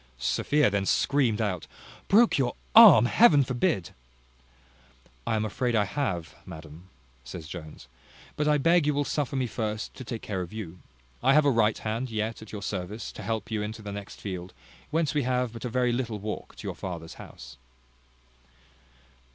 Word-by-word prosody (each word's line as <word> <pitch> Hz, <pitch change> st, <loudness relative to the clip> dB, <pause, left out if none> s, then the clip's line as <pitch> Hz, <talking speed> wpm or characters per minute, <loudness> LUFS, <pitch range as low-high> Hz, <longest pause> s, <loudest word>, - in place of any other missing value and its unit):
Sophia 145 Hz, -, +2 dB
then 100 Hz, -1 st, 0 dB
screamed 120 Hz, +1 st, +2 dB
out, 100 Hz, -6 st, -2 dB, 0.4 s
"Broke 220 Hz, -4 st, +5 dB
your 125 Hz, -2 st, 0 dB, 0.2 s
arm! 210 Hz, -, +10 dB
Heaven 145 Hz, -, +5 dB
forbid." 125 Hz, -, -1 dB, 1.4 s
"I -, -, +1 dB
am 110 Hz, 0 st, 0 dB
afraid 120 Hz, +3 st, -1 dB
I 105 Hz, -2 st, +3 dB
have, 95 Hz, -, -3 dB
madam," 80 Hz, +3 st, -11 dB, 0.3 s
says 80 Hz, +5 st, -8 dB
Jones: 80 Hz, -2 st, -9 dB, 0.5 s
"but 150 Hz, -, -1 dB
I 150 Hz, 0 st, +4 dB
beg 165 Hz, +2 st, +3 dB
you 150 Hz, -, +2 dB
will 145 Hz, 0 st, 0 dB
suffer 145 Hz, -2 st, -2 dB
me 130 Hz, -1 st, 0 dB
first 110 Hz, -2 st, -4 dB
to -, -, -9 dB
take 115 Hz, -1 st, -6 dB
care 95 Hz, -3 st, -3 dB
of 90 Hz, -, -6 dB
you. 90 Hz, -6 st, -7 dB, 0.4 s
I 135 Hz, +3 st, +4 dB
have 150 Hz, -1 st, +5 dB
a 140 Hz, -, +5 dB
right 110 Hz, -3 st, +2 dB
hand 115 Hz, +4 st, -3 dB
yet 110 Hz, 0 st, -3 dB
at 110 Hz, -, -11 dB
your 105 Hz, -2 st, -6 dB
service, 100 Hz, +3 st, -4 dB
to -, -, -10 dB
help 110 Hz, +1 st, -3 dB
you 110 Hz, -1 st, -1 dB
into 110 Hz, +1 st, -6 dB
the 100 Hz, -, -6 dB
next 100 Hz, 0 st, -8 dB
field, 90 Hz, -2 st, -6 dB, 0.3 s
whence 155 Hz, -3 st, 0 dB
we 150 Hz, -, +1 dB
have 125 Hz, -2 st, -1 dB
but 115 Hz, +1 st, -7 dB
a -, -, -2 dB
very 125 Hz, 0 st, +1 dB
little 120 Hz, -3 st, -2 dB
walk 105 Hz, +1 st, -6 dB
to -, -, -8 dB
your -, -, -3 dB
father's 85 Hz, -3 st, -6 dB
house." 65 Hz, +1 st, -12 dB
110 Hz, 180 wpm, -27 LUFS, 100-130 Hz, 1.4 s, arm